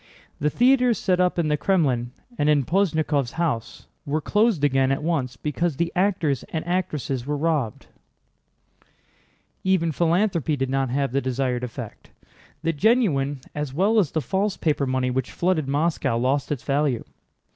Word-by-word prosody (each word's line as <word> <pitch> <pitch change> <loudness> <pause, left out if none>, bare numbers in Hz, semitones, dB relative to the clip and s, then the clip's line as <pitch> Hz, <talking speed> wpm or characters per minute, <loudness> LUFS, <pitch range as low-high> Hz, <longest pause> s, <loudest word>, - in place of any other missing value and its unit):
The 150 - +1
theaters 250 - +3
set 180 -1 +1
up 180 -1 +2
in 170 -2 +1
the 150 -1 0
Krémlin 140 -11 +1 0.3
and 145 -6 +1
in 145 -3 +3
Posnyákov's 155 -7 +1
house 150 -10 -2 0.2
were 145 +2 -1
closed 210 -1 +1
again 135 -2 +3
at 135 - -1
once 135 -7 -1
because 155 +2 -1
the 170 0 0
actors 180 -8 +1
and 160 -1 -3
actresses 150 -8 -2
were 150 0 -1
robbed. 145 -8 -1 1.8
Even 185 -3 +2
philanthropy 170 - +1
did 135 -1 -2
not 135 -1 0
have 140 0 0
the 140 +2 0
desired 130 -1 -1
effect. 120 -2 -8 0.5
The 165 - +1
genuine 150 - +2
as 150 -3 -4
well 205 +6 +3
as 180 -8 +2
the 160 - 0
false 195 +5 -1
paper 150 -3 0
money 130 -1 0
which 130 0 -2
flooded 170 -5 0
Moscow 145 -4 0
lost 130 +4 0
its 140 -4 -3
value. 140 -4 0
150 Hz, 155 wpm, -24 LUFS, 135-175 Hz, 1.8 s, theaters